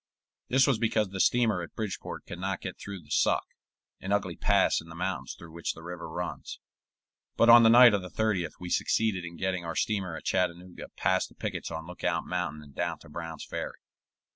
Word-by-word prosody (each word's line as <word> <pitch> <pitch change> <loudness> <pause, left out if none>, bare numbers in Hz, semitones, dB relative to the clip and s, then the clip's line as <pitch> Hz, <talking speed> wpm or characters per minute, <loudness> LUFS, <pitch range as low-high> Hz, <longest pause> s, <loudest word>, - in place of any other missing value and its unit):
This 130 +2 +5
was 135 -6 +2
because 110 -3 +1
the 95 0 -6
steamer 110 -4 +3
at 85 - -9
Bridgeport 105 -4 -5
could 90 - -8
not 95 0 -2
get 90 - -6
through 100 -4 -7
the 75 - -18
Suck, - - +2 0.5
an 95 - -5
ugly 100 -4 0
pass - - +3
in - - -14
the - - -9
mountains - - -3
through 80 - -12
which 85 +1 -3
the 80 - -12
river 85 -1 -7
runs; 90 +2 -5 0.8
but 115 - +5
on 120 0 +10
the 115 - +7
night 120 -1 +9
of 100 - +1
the 90 - -8
30th 95 -4 0
we 90 - -6
succeeded 110 -5 +1
in 85 -1 -8
getting 95 -2 -1
our 85 -1 -4
steamer 95 -6 -1
at - - -10
Chattanooga 90 0 -2
past - - +1
the - - -21
pickets - - -4
on 80 -1 -5
Lookout 90 +1 -2
Mountain 80 -4 -3
and 70 -2 -15
down - - -2
to - - -16
Brown's 80 0 -6
Ferry. - - -5
90 Hz, 210 wpm, -29 LUFS, 85-105 Hz, 0.8 s, on